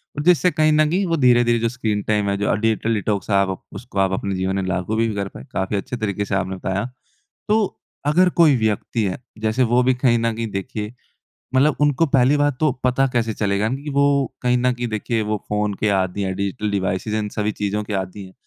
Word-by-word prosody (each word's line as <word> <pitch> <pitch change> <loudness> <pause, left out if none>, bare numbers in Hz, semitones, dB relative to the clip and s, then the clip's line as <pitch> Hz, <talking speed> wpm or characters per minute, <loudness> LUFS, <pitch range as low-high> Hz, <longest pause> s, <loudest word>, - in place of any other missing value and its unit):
और 145 - -3
जिससे 180 +1 +4
कहीं 155 -2 +3
न 155 0 +4
कहीं 185 +5 +1
वो 165 -2 0
धीरे-धीरे 120 -3 +4
जो 115 0 0
स्क्रीन 110 -4 -2
टाइम 105 -2 +1
है 100 - +1
जो 100 - +1
डिजिटल 110 +1 0
डिटॉक्स 105 -2 -2
है 100 - +2
आप 95 -1 0 0.2
उसको 120 -5 -6
आप 95 -1 +2
अपने 100 -1 -3
जीवन 95 +1 -1
में 95 - -1
लागू 90 +4 -1
भी 115 +1 +2
कर 100 -1 -2
पाए। - - -11
काफ़ी 95 +2 -2
अच्छे 125 +5 -4
तरीके 105 -3 -2
से 100 - -2
आपने 95 0 -1
बताया। 95 +2 -2 0.6
तो 215 +1 +3 0.5
अगर 180 +5 +4
कोई 155 -4 +6
व्यक्ति 110 +1 -1
है 95 -2 -1 0.2
जैसे 110 +4 +1
वो 125 - +5
भी 130 +1 +3
कहीं 125 -1 +2
न 115 0 +1
कहीं 115 0 -3
देखिए 105 +2 -4 0.6
मतलब 140 +3 +4
उनको 145 +2 +3
पहली 135 0 +3
बात 145 -2 +1
तो 155 -1 +3
पता 130 +2 +3
कैसे 115 -3 0
चलेगा 100 +1 0
न 130 - -2
कि 150 - -5
वो 140 0 +3 0.4
कहीं 125 0 +2
न 125 +1 +2
कहीं 120 0 -3
देखिए 110 +1 -1
वो 105 0 -1
फ़ोन 105 0 0
के 110 - +2
आदि 95 +1 -1
है 95 -1 -1
डिजिटल 100 +3 -2
डिवाइस 95 -1 -1
इन 105 -1 -1
सभी 105 0 0
चीज़ों 105 +1 -2
के 105 - -5
आदि 95 +1 -4
है। 95 - -13
110 Hz, 230 wpm, -21 LUFS, 100-125 Hz, 0.6 s, कोई